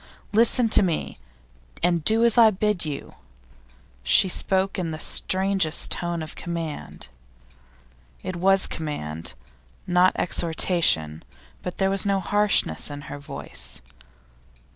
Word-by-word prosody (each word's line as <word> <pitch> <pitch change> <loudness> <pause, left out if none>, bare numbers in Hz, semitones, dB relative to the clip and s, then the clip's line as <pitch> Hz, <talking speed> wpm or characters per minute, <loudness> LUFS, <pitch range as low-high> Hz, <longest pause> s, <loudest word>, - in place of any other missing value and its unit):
Listen 230 +2 +3
to - - +7
me, 170 - -2 0.6
and 175 -2 +1
do 225 +6 +4
as 235 - +3
I 230 -2 +7
bid 210 -3 -1
you.' 145 -2 -6 0.9
She 65 - +3
spoke 190 +1 0
in 175 -2 -2
the 155 - -5
strangest 185 -1 0
tone 170 -2 -2
of 155 - -8
command. 165 - -6 1.2
It 185 - -4
was 195 +2 +4
command, 80 - -5 0.5
not 180 +1 +3
exhortation, 160 - +1 0.4
but 180 - -6
there 195 0 +1
was 195 -1 +1
no 200 -1 +1
harshness 205 - +1
in 145 0 -7
her 145 - -7
voice. 70 - -6
175 Hz, 120 wpm, -24 LUFS, 155-195 Hz, 1.2 s, to